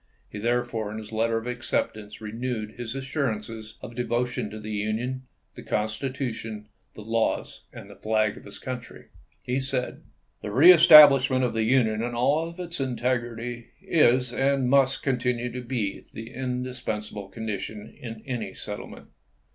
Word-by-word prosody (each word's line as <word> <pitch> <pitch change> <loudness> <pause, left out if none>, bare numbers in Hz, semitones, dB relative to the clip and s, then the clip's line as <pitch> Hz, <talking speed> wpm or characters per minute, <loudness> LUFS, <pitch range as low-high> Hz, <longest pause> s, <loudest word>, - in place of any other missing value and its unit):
He, 105 - -6
therefore, 120 -2 -1
in 110 - -6
his 110 0 -8
letter 115 +1 +1
of 115 - -4
acceptance 110 -3 -3
renewed 110 0 -4
his 120 +1 -6
assurances 115 -6 -3
of 115 - -7
devotion 120 -1 -1
to 110 - -8
the 105 0 -7
Union, 115 +5 -2 0.3
the - - -10
Constitution, 110 -1 -3 0.3
the 105 - -9
laws, 115 +1 -1
and - - -10
the - - -12
flag 110 -1 +1
of - - -13
his 100 - -9
country. 125 -2 -8 0.3
He 125 +2 -1
said: 130 -1 -3 0.4
The 105 - -5
reestablishment 145 - +8
of 125 - 0
the 110 -1 0
Union 110 -3 +2
in 120 +1 -3
all 155 +7 +1
its 170 -3 -4
integrity 120 -2 -2
is, 125 -5 +3
and 135 0 +2
mnst 135 -1 +3
continue 125 -2 0
to 125 +1 -5
be, 120 -5 -3
the 115 +1 -8
indispensable 125 -5 -4
condition 105 -1 -6
in 115 -2 -8
any 125 -4 -4
settlement. 105 0 -7
120 Hz, 145 wpm, -26 LUFS, 110-130 Hz, 0.4 s, reestablishment